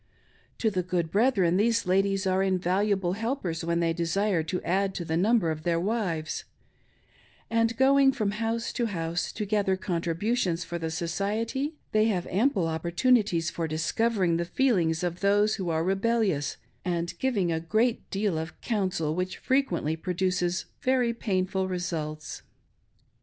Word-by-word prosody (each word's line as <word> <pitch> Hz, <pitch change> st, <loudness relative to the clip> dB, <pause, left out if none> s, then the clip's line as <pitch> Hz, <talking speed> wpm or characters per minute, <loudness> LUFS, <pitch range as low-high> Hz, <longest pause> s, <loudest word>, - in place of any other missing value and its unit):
To 220 Hz, -, +1 dB
the 185 Hz, -2 st, 0 dB
good 175 Hz, -2 st, -2 dB
brethren 195 Hz, -6 st, +3 dB
these 230 Hz, +3 st, +2 dB
ladies 195 Hz, +1 st, +1 dB
are 190 Hz, 0 st, +2 dB
invaluable 190 Hz, 0 st, +1 dB
helpers 205 Hz, -7 st, -2 dB
when 170 Hz, 0 st, 0 dB
they 165 Hz, -1 st, +1 dB
desire 175 Hz, +2 st, +1 dB
to 180 Hz, +3 st, -3 dB
add 190 Hz, +2 st, 0 dB
to 175 Hz, -, -4 dB
the 160 Hz, -, -1 dB
number 195 Hz, -1 st, +3 dB
of 155 Hz, 0 st, -4 dB
their 170 Hz, +1 st, +1 dB
wives; 180 Hz, -6 st, -2 dB, 1.1 s
and 230 Hz, 0 st, +1 dB
going 270 Hz, +1 st, +5 dB
from 215 Hz, -7 st, -1 dB
house 225 Hz, +2 st, -2 dB
to 240 Hz, -2 st, 0 dB
house 170 Hz, -4 st, -2 dB
to 210 Hz, -, -3 dB
gather 200 Hz, -2 st, +1 dB
contributions 175 Hz, +1 st, -1 dB
for 170 Hz, +1 st, -5 dB
the 165 Hz, -1 st, -2 dB
Society, 215 Hz, -, -2 dB, 0.2 s
they 215 Hz, 0 st, +3 dB
have 190 Hz, -6 st, 0 dB
ample 210 Hz, 0 st, +2 dB
oppor 165 Hz, +1 st, -2 dB
tunities 190 Hz, -6 st, +2 dB
for 165 Hz, -1 st, -2 dB
discpvering 170 Hz, +3 st, +1 dB
the 170 Hz, -, -1 dB
feelings 175 Hz, -8 st, +1 dB
of 175 Hz, 0 st, -2 dB
those 205 Hz, +2 st, +3 dB
who 185 Hz, -4 st, -3 dB
are 160 Hz, 0 st, +1 dB
rebellious, 195 Hz, -5 st, 0 dB, 0.3 s
and 175 Hz, -1 st, -2 dB
giving 205 Hz, -10 st, +1 dB
a 160 Hz, -, 0 dB
great 220 Hz, +8 st, 0 dB
deal 195 Hz, -5 st, 0 dB
of 160 Hz, +1 st, -7 dB
"counsel"' 185 Hz, -8 st, -1 dB
which 180 Hz, +2 st, -3 dB
frequently 260 Hz, -, 0 dB
produces 180 Hz, +1 st, -1 dB, 0.2 s
very 250 Hz, -2 st, +2 dB
painful 190 Hz, -4 st, -1 dB
results. 165 Hz, -4 st, -4 dB
190 Hz, 150 wpm, -27 LUFS, 170-220 Hz, 1.1 s, going